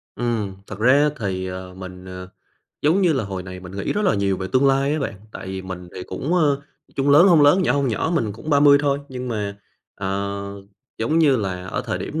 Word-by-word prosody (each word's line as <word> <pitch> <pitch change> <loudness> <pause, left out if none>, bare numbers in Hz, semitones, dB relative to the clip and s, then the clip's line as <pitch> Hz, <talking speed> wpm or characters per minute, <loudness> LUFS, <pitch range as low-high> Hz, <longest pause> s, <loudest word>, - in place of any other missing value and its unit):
Ừm, 115 -5 -2
thật 105 -1 -8
ra 140 +6 +5
thì, 95 -3 -2
ờ, 90 0 -7
mình, 95 0 -9
ờ, 90 0 -8 0.5
giống 165 +7 +3
như 175 -4 +4
là 130 -6 -1
hồi 95 -2 -5
này 90 0 -8
mình 90 0 -10
nghĩ 100 - -1
rất 210 - -1
là 190 - +3
nhiều 100 -1 +1
về 95 - -4
tương 130 +2 +4
lai 135 +1 +3
á 155 - 0
bạn, 115 -5 -3 0.2
tại - - -8
vì 95 0 -5
mình 90 -1 -7
thì 90 - -6
cũng, 140 - -2
ơ, 145 -5 +3 0.4
chung 140 +1 +2
lớn 155 +7 +8
hông 160 -4 +6
lớn, 180 +7 +5
nhỏ - - +2
hông 140 -2 +1
nhỏ 140 +9 -1
mình 110 -10 0
cũng 115 +9 -7
30 145 0 +6
thôi, 140 -1 +1
nhưng 125 -1 -5
mà, 105 -3 -3 0.4
ờ, 100 +1 -3 0.6
giống 120 +9 +1
như 145 -5 +5
là 95 -4 -3
ở - - -3
thời - - -2
điểm 160 - -4
115 Hz, 235 wpm, -22 LUFS, 95-145 Hz, 0.6 s, lớn